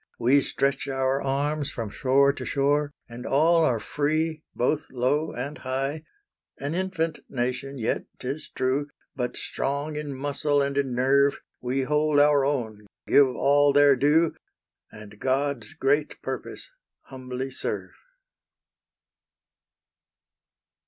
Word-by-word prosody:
We 130 +4 +4
stretch 140 +1 -1
our 135 0 0
arms 145 +2 0
from 115 -5 -5
shore 140 +3 +3
to - - -7
shore 145 +1 +1 0.2
And 120 +1 -9
all 165 +4 +3
are 125 -7 +2
free, 155 +5 -1
both 145 +5 0
low 140 +5 0
and 140 +5 -5
high; 135 +4 -3 0.5
An 140 +2 -4
infant 170 -3 -1
nation 130 +2 -3
yet, 115 -2 -1
'tis 135 +4 -5
true, 135 +3 -1 0.3
But 125 -2 -3
strong 145 +2 -2
in 145 -2 -4
muscle 145 +1 0
and 140 0 0
in 135 -3 0
nerve, 140 +3 +3 0.2
We 125 +2 -1
hold 150 +1 +2
our 145 -1 +5
own, 110 -7 -2 0.2
give 140 -1 +6
all 145 +2 +3
their 145 -1 +6
due, 150 +5 +3 0.6
And 105 -1 -12
God's 135 +1 -1
great 145 0 0
purpose - - -6 0.3
humbly 130 0 -6
serve. - - -4
140 Hz, 125 wpm, -26 LUFS, 130-145 Hz, 0.6 s, give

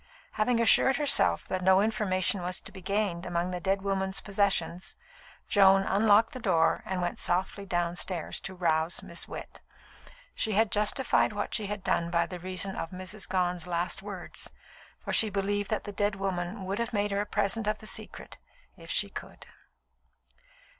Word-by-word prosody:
Having 230 +2 +1
assured 235 +4 +5
herself 290 -1 +4
that 185 - -2
no 190 +1 +5
information 200 -3 0
was 180 +1 -2
to - - -11
be 190 - -11
gained 195 -2 -1
among 175 0 -2
the 180 - -3
dead 195 +2 0
woman's 190 -1 -1
possessions, 195 -3 -1 0.5
Joan 195 -2 +6
unlocked 215 +5 +4
the 255 - -6
door 175 -8 +2
and 185 -2 -2
went 175 - -3
softly 190 +3 -1
downstairs 175 0 -1
to 190 - -8
rouse 165 -2 0
Miss - - -6
Witt. - - -9 0.7
She 220 - -1
justified 210 +3 +2
what 205 0 -3
she 210 - 0
had 205 -1 -5
done 170 -3 0
by 170 -1 +2
reason 185 +2 -3
of 165 - -4
Mrs. 185 +3 -6
Gone's 180 -2 0
last 175 +2 -1
words, 195 -3 -6 0.5
for - - -5
she 220 - +6
believed 205 0 -1
that 215 - -1
the 205 - -6
dead 205 0 0
woman 190 0 -3
would 195 +3 -3
have 235 +1 -2
made 205 -1 0
her 200 0 +1
a 205 - -4
present 205 +2 0
of 215 0 +1
the 215 - -13
secret - - -6 0.4
if - - -14
she - - +1
could. - - -9
195 Hz, 170 wpm, -29 LUFS, 180-205 Hz, 0.7 s, Joan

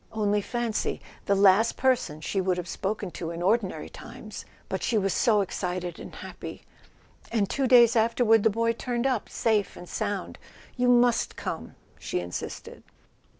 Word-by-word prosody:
Only 210 -1 +1
fancy—the 225 -3 -2
last 200 +3 +5
per¬ 260 0 +4
son 155 -9 -8
she 195 +4 -1
would 185 -1 0
have 180 0 -4
spoken 195 +1 -3
to 165 -1 -5
in 170 +1 -5
ordinary 200 0 +1
times! - - -10 0.2
But - - -3
she 235 - +1
was 195 -2 +1
so 215 -5 +3
excited 180 -2 -3
and - - -9
happy! - - -8 0.7
And 215 -4 +1
two 270 +6 0
days 240 -2 +7
after¬ 230 +1 +2
ward 225 -1 +6
the 225 - +4
boy 230 +2 +1
turned 240 +1 -2
up 255 -5 0
safe 215 -4 0
and 175 - -10
sound. 205 -2 -3 0.4
You 250 0 +1
must 245 -1 +3
come!" - - -5 0.2
she - - -2
insisted. 90 0 -6
215 Hz, 165 wpm, -27 LUFS, 190-235 Hz, 0.7 s, days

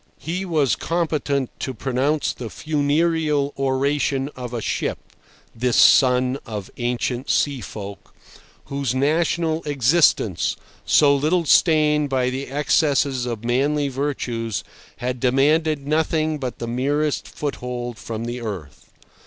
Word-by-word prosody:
He 180 +4 -4
was 155 -7 +2
competent 155 -6 -1
to 130 - -4
pronounce 135 +5 0
the 120 -3 -7
funereal 150 0 0
oration 135 +1 0
of 125 -2 -6
a 120 - -3
ship, - - -2 0.6
this 120 +1 0
son 130 0 +5
of 105 -4 -7
ancient 125 +1 -2
sea 140 -3 +1
folk, 100 0 -8 0.5
whose 140 -3 -2
national 160 +3 +1
existence, 140 - +2 0.3
so 140 -1 +5
little 160 +5 +1
stained 150 -2 +4
by 130 -1 +1
the 135 +2 -4
excesses 140 -2 +1
of 115 -2 -4
manly 140 +4 +1
virtues, 125 -5 -3 0.3
had 125 0 -3
demanded 140 +4 +2
nothing 155 0 0
but 130 -3 -4
the 120 - -5
merest 145 +5 -1
foothold 125 -4 -5
from 115 0 -5
the 120 +1 -4
earth. 95 - -7
140 Hz, 120 wpm, -22 LUFS, 125-150 Hz, 0.6 s, son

